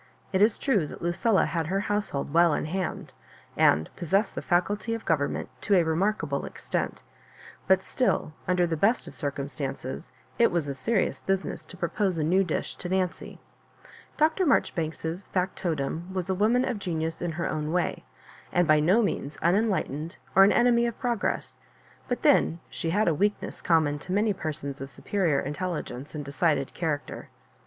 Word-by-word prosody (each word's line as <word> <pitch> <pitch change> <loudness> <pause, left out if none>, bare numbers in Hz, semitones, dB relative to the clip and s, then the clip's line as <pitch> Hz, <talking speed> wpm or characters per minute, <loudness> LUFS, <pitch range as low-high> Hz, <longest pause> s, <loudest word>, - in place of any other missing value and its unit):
It 190 - +2
is 210 0 +4
true 210 - +1
that - - -9
Lu 170 - +1
cilla 215 +3 +2
had 165 -2 -2
her 195 +3 0
household 205 -10 -2
well 170 -2 +5
in - - -2
hand, 185 +2 -3 0.4
and 80 +2 +4
pos 175 - -6
sessed 195 +6 +2
the - - -4
Acuity 205 +6 +1
of 230 - -8
government 145 -3 0
to 205 - +3
a 175 - +5
remark 185 +7 +1
able 140 -2 -2
extent; - - -4 0.6
but 190 0 +4
still, 245 -11 0
under 180 -1 +3
the 165 -1 -1
best 210 +9 +2
of - - -10
cir 145 - -2
cumstances, 140 0 -5 0.3
it 235 - +5
was 170 -4 0
a 140 - -2
serious 215 +9 0
business 195 0 -2
to 185 - -12
propose 180 +1 0
a 155 - 0
new 185 +5 +3
dish 175 - -3
to 180 - -6
Nancy. 185 -1 -2 0.8
Dr. 315 +5 +3
Marjoribanks's 165 - 0
fac 185 0 -1
totum 165 +1 -3
was 185 0 -2
a - - +2
woman 225 +7 +3
of 235 -5 -2
genius 165 -3 -3
in 175 -2 -2
her 165 -1 -2
way, 175 +2 -1 0.5
and 175 -1 +2
by 155 -1 +5
no 185 +10 +4
means 150 -7 -2
unenlightened 170 - +1 0.2
or 195 - +9
an 195 - +6
enemy 240 -1 +4
of 235 - -4
progress; 240 -3 -1 0.5
but - - -2
then 165 - +4
she 165 - -3
had 205 +6 +2
a 165 - +4
weakness 205 +6 -1
oomnaon 155 -4 +2
to 180 - -8
many 210 +2 +2
persons 145 -6 -5
of 135 - -5
superior 170 -2 0
intelligence 150 -3 -4
and 145 -1 -4
de 140 - -7
cided 145 -3 +1
character. 155 -4 -3
175 Hz, 180 wpm, -27 LUFS, 155-200 Hz, 0.8 s, or